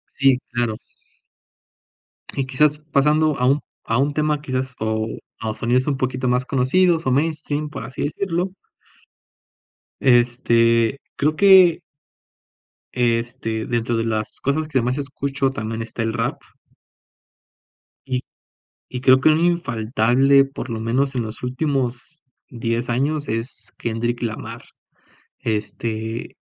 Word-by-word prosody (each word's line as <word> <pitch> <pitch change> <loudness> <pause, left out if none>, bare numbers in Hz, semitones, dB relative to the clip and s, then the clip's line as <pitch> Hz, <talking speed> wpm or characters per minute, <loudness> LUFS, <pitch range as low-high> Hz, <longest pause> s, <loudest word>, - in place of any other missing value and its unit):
Sí, 135 -2 +4
claro. 120 -2 -1 1.6
Y 135 - -1
quizás, 150 +3 +2
pasando 150 +2 +3
a 125 - +2
un 140 +2 +3 0.3
a 115 - +2
un 145 +1 +1
tema, 150 0 0
quizás, 130 -2 -3
o, 110 0 -1 0.3
a 110 -1 -2
sonidos 125 +5 +1
un 140 - +1
poquito 130 0 -2
más 125 +1 +2
conocidos, 165 +7 +2
o 130 - +3
mainstream, 150 +1 -1
por 150 - -7
así 130 - -5
decirlo 180 +4 -2 1.5
este, 120 -1 +3 0.2
creo 150 +2 +1
que 190 -3 +7 1.1
este, 115 -2 -1
dentro 120 -1 -1
de 115 - 0
las 110 -1 -1
cosas 155 +3 0
que 135 -4 +1
más 125 +3 -1
escucho 140 -1 -1
también 110 -2 -4
está 115 0 -4
el 115 0 -1
rap. 115 0 -2 1.7
Y, 130 -1 -1 0.7
y 125 - -5
creo 130 0 +6
que - - +5
un 155 +1 +4
infaltable 135 -4 +3
por 135 -2 -7
lo 115 -1 -3
menos 130 +5 0
en 125 - 0
los 110 +2 -6
últimos 130 +2 -2 0.3
10 115 0 -2
años 145 +5 0
es 115 +3 -3
Kendrick 120 +1 -2
Lamar. 110 -1 -5 0.8
Este 110 +1 -3
130 Hz, 125 wpm, -21 LUFS, 115-145 Hz, 1.7 s, que